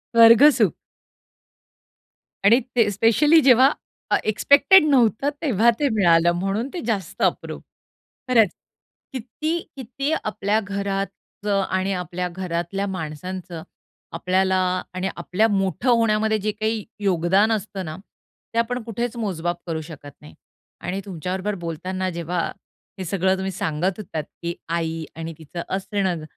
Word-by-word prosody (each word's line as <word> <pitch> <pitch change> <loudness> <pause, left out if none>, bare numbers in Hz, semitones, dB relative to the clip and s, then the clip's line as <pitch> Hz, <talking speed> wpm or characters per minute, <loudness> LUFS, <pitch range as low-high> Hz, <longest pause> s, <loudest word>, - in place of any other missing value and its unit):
स्वर्ग 230 +2 +8
सुख. - - +3 1.7
आणि 230 +5 +7 0.2
ते 230 -4 +4
स्पेशली 230 - +4
जेव्हा 260 +1 +6 0.4
अ, - - +4
एक्स्पेक्टेड 285 - +5
नव्हतं 255 0 +3
तेव्हा 235 - +3
ते 290 - +2
मिळालं 175 -4 +4
म्हणून 195 +6 -1
ते 360 - -4
जास्त 195 -7 -3
अप्रूप. - - -1 0.7
खरंच 225 -6 +5 0.6
किती, 305 +7 -3 0.2
किती 275 +3 -4
आपल्या 210 0 0
घरात 200 0 -5 0.2
आणि 190 +1 0
आपल्या 180 0 -3
घरातल्या 180 +2 -3
माणसांचं 175 0 -6 0.5
आपल्याला 185 +3 +1 0.4
आणि 185 +1 -2
आपल्या 215 +5 +1
मोठं 195 - 0
होण्यामध्ये 220 -2 +3
जे 210 +1 -1
काही 215 0 -2 0.2
योगदान 195 +2 +2
असतं 200 -3 -3
ना, 155 0 -6 0.6
ते - - -3
आपण 245 +2 -1
कुठेच 235 +1 -4
मोजमाप 175 -6 -2
करू 160 -1 -2
शकत 150 -3 -10
नाही. 150 - -13 0.5
आणि 190 +2 -3
तुमच्या 180 -2 -5
बरोबर 205 +2 -2
बोलताना 185 +3 -3
जेव्हा 170 0 -3 0.6
हे 185 - -4
सगळं 190 +1 +1
तुम्ही 190 0 -3
सांगत 180 +2 -2
होतात, 160 -7 -4 0.2
की 170 0 -3
आई 165 -1 -2
आणि 165 0 -6
तिचं 165 +2 -7
असणं 190 -4 -2
195 Hz, 130 wpm, -23 LUFS, 175-225 Hz, 1.7 s, स्वर्ग